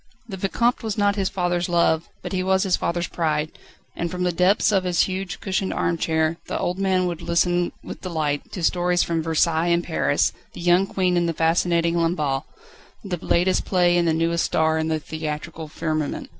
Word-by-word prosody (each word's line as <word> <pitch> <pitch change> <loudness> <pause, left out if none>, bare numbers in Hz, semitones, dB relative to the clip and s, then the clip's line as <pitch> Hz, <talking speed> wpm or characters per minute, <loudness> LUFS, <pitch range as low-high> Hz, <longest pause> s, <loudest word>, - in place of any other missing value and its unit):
The 200 - -6
Vicomte 235 +6 0
was 220 -2 -3
not 205 -1 +2
his 195 -2 0
father's 175 -1 -1
love, 170 -1 +2
but - - -5
he 185 - 0
was 190 +1 +2
his 190 -3 +2
father's 170 0 -2
pride, 155 -2 -1 0.4
and 170 - -2
from 180 0 -3
the 180 - +2
depths 180 +5 +3
of 195 -2 +2
his 180 -2 +2
huge, 185 -1 -2
cushioned 190 -1 -1
arm 170 - 0
chair, 160 0 +1
the - - -2
old 180 +2 -2
man 190 -2 +2
would 175 -2 -3
listen 175 +1 +1
with - - -8
delight 155 -5 -2
to 180 - -5
stories 175 +1 +2
from 165 -1 -1
Versailles 165 +1 +1
and 170 0 +2
Paris, 160 - +1 0.2
the - - -9
young 175 +2 +3
Queen 180 -2 +1
and 170 -1 +1
the - - -1
fascinating 170 +1 +2
Lamballe, 155 -5 0 0.6
the 180 -5 -5
latest 180 +2 +2
play 175 -2 +3
and 175 -1 +2
the - - +3
newest 165 +1 +1
star 160 0 +1
in 160 - -1
the 160 -1 0
theatrical 155 0 -5
firmament. 155 -1 -3
175 Hz, 200 wpm, -23 LUFS, 160-185 Hz, 0.6 s, depths